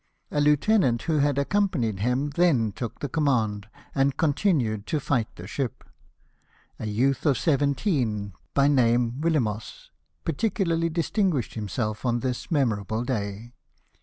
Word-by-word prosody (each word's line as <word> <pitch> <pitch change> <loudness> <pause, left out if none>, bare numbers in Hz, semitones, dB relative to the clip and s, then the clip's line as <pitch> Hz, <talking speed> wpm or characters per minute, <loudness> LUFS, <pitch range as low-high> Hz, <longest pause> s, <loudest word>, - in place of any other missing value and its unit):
A 145 - +1
lieutenant, 150 - +3
who 155 -2 +1
had 145 -1 +2
accompanied 140 - 0
him, 125 +7 0
then 140 -9 +2
took 115 +2 -6
the 145 - -1
command, 115 -9 0 0.3
and 135 0 +1
continued 140 - +1
to 155 - 0
fight 125 -5 0
the 85 - -9
ship. 125 +4 -4 1.0
A 110 - -4
youth 130 +6 +1
of 135 -4 +3
seven 140 -3 +2
teen, 110 - -1 0.2
by 140 0 +4
name 120 -1 +2
Yillemoes, 120 -10 -1 0.3
particularly 165 -1 0
distinguished 165 - 0
himself 110 0 -3
on 120 -2 0
this 125 -2 -3
memorable 110 - 0
day. 110 -2 -4
130 Hz, 135 wpm, -26 LUFS, 110-150 Hz, 1.0 s, by